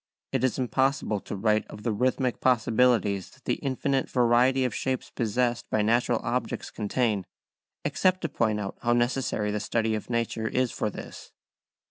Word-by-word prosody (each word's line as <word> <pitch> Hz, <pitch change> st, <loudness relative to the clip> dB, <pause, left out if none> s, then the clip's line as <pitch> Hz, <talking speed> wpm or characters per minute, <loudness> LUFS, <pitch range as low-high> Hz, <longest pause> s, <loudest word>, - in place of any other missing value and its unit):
It -, -, 0 dB
is 130 Hz, -, +1 dB
impossible 130 Hz, -3 st, +1 dB
to -, -, -6 dB
write 105 Hz, +1 st, +1 dB
of 105 Hz, -, -10 dB
the 115 Hz, -, 0 dB
rhythmic 125 Hz, +3 st, 0 dB
possibilities 110 Hz, -5 st, +2 dB
that -, -, -22 dB
the -, -, 0 dB
infinite 135 Hz, 0 st, 0 dB
variety 125 Hz, +2 st, +3 dB
of 125 Hz, -, -1 dB
shapes 130 Hz, +3 st, -2 dB
possessed 120 Hz, +1 st, -1 dB
by 110 Hz, -, +1 dB
natural 120 Hz, +2 st, +2 dB
objects 125 Hz, +2 st, -2 dB
contain, 105 Hz, -1 st, 0 dB, 0.6 s
except 185 Hz, -1 st, +2 dB
to 165 Hz, -, -2 dB
point 110 Hz, -2 st, 0 dB
out 100 Hz, -1 st, -5 dB
how 120 Hz, 0 st, +2 dB
necessary 120 Hz, -3 st, 0 dB
the 105 Hz, -, -1 dB
study 110 Hz, +1 st, 0 dB
of 110 Hz, +1 st, -4 dB
nature 115 Hz, -1 st, -1 dB
is 125 Hz, +1 st, 0 dB
for 105 Hz, -, -1 dB
this. -, -, -9 dB
120 Hz, 165 wpm, -27 LUFS, 110-130 Hz, 0.6 s, variety